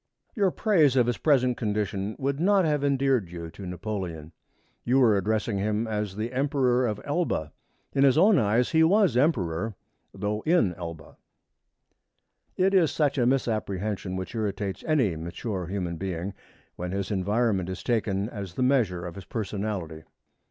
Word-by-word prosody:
Your 200 -4 +3
praise 165 - +3
of 125 -2 +4
his 120 0 -1
present 130 -5 +3
condition 105 -2 -2
would 140 +1 -2
not 195 +1 +3
have 150 -2 +1
endeared 135 -8 +1
you 85 -1 -7
to 95 +1 -9
Napoleon. 90 -5 -5 0.5
You 125 +2 +2
were 120 -6 +5
addressing 105 +1 0
him 105 +2 0
as 105 -3 -3
the 110 +4 -4
Emperor 130 -2 +2
of 105 -2 -3
Elba. 145 - -1 0.4
In 140 - +3
his 135 0 +5
own 190 +1 +6
eyes 115 +3 +2
he 160 0 +4
was 190 - +4
Emperor, 110 - +1 0.4
though 105 +2 -3
in 155 - +2
Elba. 85 -3 -9 1.4
It 190 +1 +3
is 175 -5 +5
such 145 -3 0
a 120 - +3
misapprehension 105 -6 -1
which 95 0 -5
irritates 100 -3 -3
any 130 - +2
mature 90 +3 -4
human 90 -3 -3
being 95 +1 -4 0.4
when 90 +1 -4
his 100 0 -3
environment 100 -1 0
is 95 - -6
taken 105 -4 0
as 100 -6 -7
the 130 - 0
measure 110 -10 +1
of 85 - -6
his 95 0 -10
personality. 100 -7 -4
110 Hz, 160 wpm, -26 LUFS, 95-135 Hz, 1.4 s, own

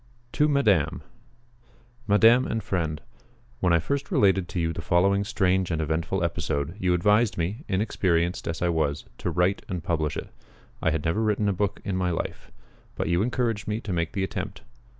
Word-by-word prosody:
TO 150 - +2
MADAME 110 - +2 1.0
MADAME 115 +5 +5
AND 115 - -2
FRIEND, 80 -5 -2 0.6
When 90 -4 +2
I 85 - +5
first 140 - -2
related 95 -3 +3
to 85 - -3
you 80 -1 0
the 80 - -5
following 95 +5 +2
strange 95 -3 +1
and 80 -2 -1
eventful 80 +4 -1
episode, 75 -1 -2
you 90 -2 +2
advised 105 +3 +3
me, 95 - -2
inexperienced 90 -4 0
as 85 +1 -2
I 85 - +2
was, 75 -4 0
to - - -2
write 90 +3 +1
and 90 -4 -3
publish 80 -3 -1
it. - - -6 0.5
I - - +2
had 80 -2 -2
never 85 +7 +1
written 105 -1 +1
a 100 - +2
book 100 +1 -2
in 100 - -1
my 90 -1 0
life; 85 - -4 0.4
but - - -2
you 85 +1 +2
encouraged 115 -2 -1
me 105 +1 -1
to 100 - -4
make 85 -2 -1
the 100 -3 -1
attempt. 95 +5 -5
95 Hz, 185 wpm, -26 LUFS, 85-105 Hz, 1.0 s, MADAME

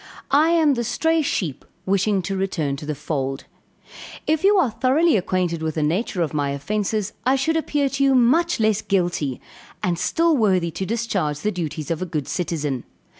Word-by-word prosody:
I 300 +4 +5
am 320 -4 +4
the 240 -2 -1
stray 320 +7 +1
sheep 175 - -2 0.2
wishing 195 0 +1
to 195 +3 -3
return 170 -7 -1
to 150 +1 -8
the 150 - -2
fold. 135 -2 -3 0.8
If 315 +2 +1
you 405 +1 +5
are 305 -11 +3
thoroughly 265 +9 +3
acquainted 180 -3 0
with 160 -1 -2
the 155 - 0
nature 175 +3 0
of 155 - -4
my 145 -2 0
offences, 210 +8 -2
I 260 +4 +3
should 275 +5 0
appear 295 -3 +1
to 275 0 -1
you 270 -1 +4
much 320 +8 +3
less 215 -1 +2
guilty, 175 -9 -1 0.4
and 175 -2 0
still 330 - +2
worthy 185 -8 +2
to 190 +4 -4
discharge 195 -10 -1
the 210 - 0
duties 160 -3 -4
of 165 - -2
a 185 - -2
good 155 -5 -3
citizen. 150 -8 -2
195 Hz, 185 wpm, -22 LUFS, 160-265 Hz, 0.8 s, I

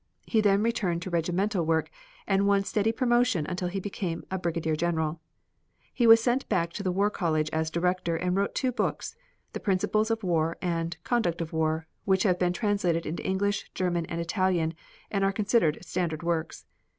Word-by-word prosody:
He 220 - +2
then 205 0 +3
returned 195 -7 0
to 185 - -6
regimental 175 +3 0
work 160 0 0 0.3
and 195 0 +2
won 200 -1 +3
steady 215 +2 +1
promotion 240 - +2
until 180 +2 -3
he 190 +2 -3
became 185 -3 -4 0.2
brigadier 165 -2 -1
general. 160 -1 -1 0.7
He 240 -3 +2
was 225 0 +9
sent 250 +2 0
back 170 -4 0
to - - -4
the 185 -2 0
War 200 +3 +1
College 155 -5 0
as 160 0 0
Director 170 0 0
and 180 +2 -1
wrote 200 +1 0
two 255 - +1
books, 250 - -2 0.4
"The - - -4
Principles 205 +2 +1
of 225 -1 -1
War" 165 -2 +1
and 170 -2 -2
"Conduct 220 -9 0
of 165 -1 -4
War," 160 0 0 0.2
which 190 -1 +3
have 180 -3 +2
been 180 -1 +2
translated 180 -4 0
into 160 - -4
English, 200 +2 -1
German 175 -2 -1
and 170 - -4
Italian 170 -2 0 0.4
and 195 -2 0
are 195 - +3
considered 205 -6 +2
standard 170 -4 -2
works. 170 -2 -2
180 Hz, 180 wpm, -28 LUFS, 165-205 Hz, 0.7 s, was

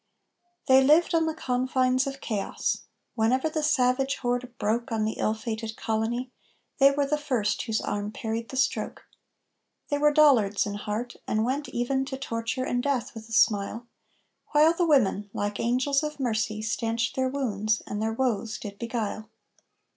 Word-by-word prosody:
They 265 0 +6
lived 315 +6 +4
on 325 -1 +3
the 320 - -2
confines 255 -1 +1
of 275 0 -6
chaos. 210 -4 -2 0.3
Whenever 250 +6 +1
the 310 0 -2
savage 270 -2 +2
horde 245 0 -2
broke 235 +4 -1
On 220 -1 0
the 220 - -3
ill 215 - +1
fated 220 -1 -5
colony, 230 +3 -2 0.5
they 275 0 +8
were 280 0 +1
the 300 +2 0
first 245 -8 0
whose 225 -2 -1
arm 205 0 -3
parried 225 +1 -4
the 265 - -6
stroke. 265 - -1 0.8
They 290 - 0
were 295 0 +5
Dollards 255 -10 +4
in 205 - -4
heart, 210 +4 -4
and 215 +1 +1
went 280 +4 -2
even 265 +3 0
to 265 0 -5
torture 230 -1 -3
and 245 -1 0
death 265 -2 -1
with 225 -1 -10
a - - -14
smile, 220 +1 +2 0.7
While 305 +2 +6
the 340 0 +1
women, 210 -8 +2
like 205 0 -2
angels 255 +4 +1
of 300 -1 -4
mercy, 220 -4 -1
stanched 230 +1 -1
their 260 0 +1
wounds 215 -6 -1
and 205 +1 -4
their 220 0 0
woes 225 -3 -1
did 200 -1 -8
beguile. 220 -2 -3
245 Hz, 170 wpm, -27 LUFS, 220-270 Hz, 0.8 s, they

